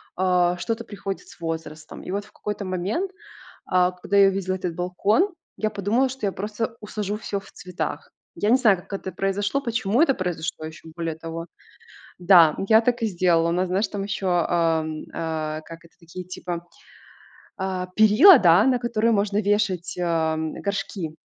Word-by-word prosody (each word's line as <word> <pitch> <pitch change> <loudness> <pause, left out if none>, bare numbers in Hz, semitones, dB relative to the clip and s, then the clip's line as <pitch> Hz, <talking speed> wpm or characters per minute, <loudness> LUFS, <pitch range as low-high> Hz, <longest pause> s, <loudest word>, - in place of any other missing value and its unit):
а, 180 -1 +2
что-то 230 +4 -3
приходит 200 -3 -6
с - - -16
возрастом. 160 -1 -6
И - - -10
вот 200 +1 -3
в 210 - -20
какой-то 210 -1 -5
момент, 195 - -2 0.5
а, 180 0 +3
когда 185 +2 -2
я 195 - +7
увидела 190 -1 -2
этот 180 -3 -4
балкон, 200 - +1 0.2
я 215 - 0
подумала, 220 +6 +1
что 260 -5 -3
я 195 - 0
просто 215 +4 -4
усажу 210 -1 -4
всё 205 -2 -4
в 195 - -16
цветах. 180 0 -5 0.2
Я 210 - 0
не 250 - +6
знаю, 215 -7 +4
как 175 - -15
это 190 -1 -4
произошло, 200 +8 -1
почему 235 0 0
это 275 -5 +4
произошло, 165 -3 -4
ещё 160 +1 -10
более 165 -2 -3
того. 165 +1 -6 0.7
Да, 175 -4 +6
я 220 0 +7
так 245 +1 0
и 225 - +2
сделала. 170 -3 +2
У - - 0
нас, 180 +1 0
знаешь, 195 +3 0
там 200 - -4
ещё, 195 -1 -3 0.2
ам, 160 -2 0
а, 155 -1 -3
как 165 0 -11
это, 170 - -20
такие 175 +2 -9
типа, 175 -1 -6 0.9
а, 185 -1 -3
перила, 220 - +8
да, 175 +1 +6
на 255 -2 +3
которые 235 -1 +1
можно 205 -1 +1
вешать, 195 -4 0
а, 165 -2 +1
м, 160 0 -3
горшки. 195 -5 -4
190 Hz, 180 wpm, -24 LUFS, 170-210 Hz, 0.9 s, перила